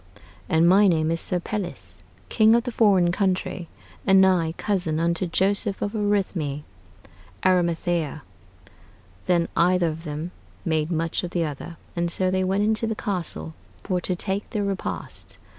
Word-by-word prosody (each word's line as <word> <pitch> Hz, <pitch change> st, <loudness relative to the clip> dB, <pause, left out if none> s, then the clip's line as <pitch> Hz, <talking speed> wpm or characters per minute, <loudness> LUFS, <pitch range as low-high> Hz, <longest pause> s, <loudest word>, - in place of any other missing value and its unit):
"And 165 Hz, +1 st, +4 dB
my 200 Hz, +3 st, +6 dB
name 160 Hz, -3 st, +2 dB
is 165 Hz, -, -1 dB
Sir 180 Hz, -, 0 dB
Pelles, 190 Hz, 0 st, -5 dB, 0.3 s
king 220 Hz, 0 st, +5 dB
of 235 Hz, -, +2 dB
the 245 Hz, -, -4 dB
forrain 195 Hz, -7 st, +4 dB
countrey, 185 Hz, -2 st, -1 dB, 0.4 s
and 195 Hz, -1 st, +5 dB
nigh 180 Hz, -4 st, +3 dB
cousin 175 Hz, -7 st, 0 dB
unto 170 Hz, +2 st, +1 dB
Joseph 195 Hz, +3 st, +1 dB
of 205 Hz, -, -2 dB
Arithmy" 195 Hz, -9 st, -1 dB, 0.8 s
[Arimathea]. 170 Hz, -4 st, +1 dB, 1.0 s
Then 170 Hz, -2 st, +2 dB
either 175 Hz, 0 st, +3 dB
of 160 Hz, +1 st, -7 dB
them 155 Hz, +2 st, -5 dB, 0.3 s
made 160 Hz, -2 st, 0 dB
much 165 Hz, 0 st, -1 dB
of 180 Hz, -, -3 dB
the 170 Hz, -1 st, 0 dB
other, 155 Hz, +3 st, -7 dB, 0.2 s
and 170 Hz, 0 st, 0 dB
so 185 Hz, +1 st, 0 dB
they 185 Hz, 0 st, +1 dB
went 195 Hz, +2 st, +1 dB
into 220 Hz, +1 st, +1 dB
the 220 Hz, -, -2 dB
castle 170 Hz, -, -4 dB, 0.3 s
for 180 Hz, -1 st, -1 dB
to 180 Hz, -, -1 dB
take 195 Hz, +2 st, -3 dB
their 210 Hz, -3 st, -2 dB
repast. 195 Hz, -1 st, -5 dB
180 Hz, 155 wpm, -24 LUFS, 165-195 Hz, 1.0 s, my